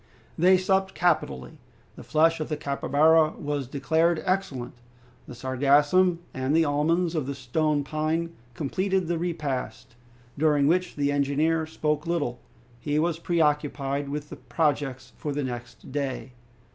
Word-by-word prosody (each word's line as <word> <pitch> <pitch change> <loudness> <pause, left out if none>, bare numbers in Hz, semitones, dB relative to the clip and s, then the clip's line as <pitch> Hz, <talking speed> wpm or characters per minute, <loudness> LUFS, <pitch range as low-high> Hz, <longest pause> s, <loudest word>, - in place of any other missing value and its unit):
They 185 +3 +5
supped 190 +1 0
capitally. 155 - 0 0.4
The - - -10
flesh 165 +1 +2
of 155 - -4
the 150 - -2
capybara 155 +3 +3
was 145 -3 -3
declared 160 +5 +1
excellent. 180 -11 -2 0.5
The 125 - -9
sargassum 145 +8 +3 0.2
and 130 +3 0
the 165 0 +4
almonds 160 +4 +1
of 155 -5 -2
the 140 - -3
stone 145 +3 0
pine 155 +3 -1 0.2
completed 185 +7 -1
the 170 0 -1
repast, 150 -10 -4 0.5
during 150 -2 +3
which 180 +4 +1
the 145 -1 0
engineer 150 +3 +1
spoke 150 -1 -2
little. 145 -8 -1 0.4
He 145 +2 -1
was 165 +1 0
preoccupied 145 -4 0
with 150 +1 -5 0.2
projects 145 -5 -1
for 150 - -4
the 145 0 -2
next 120 0 -7
day. 135 -2 -3
150 Hz, 135 wpm, -26 LUFS, 140-165 Hz, 0.5 s, They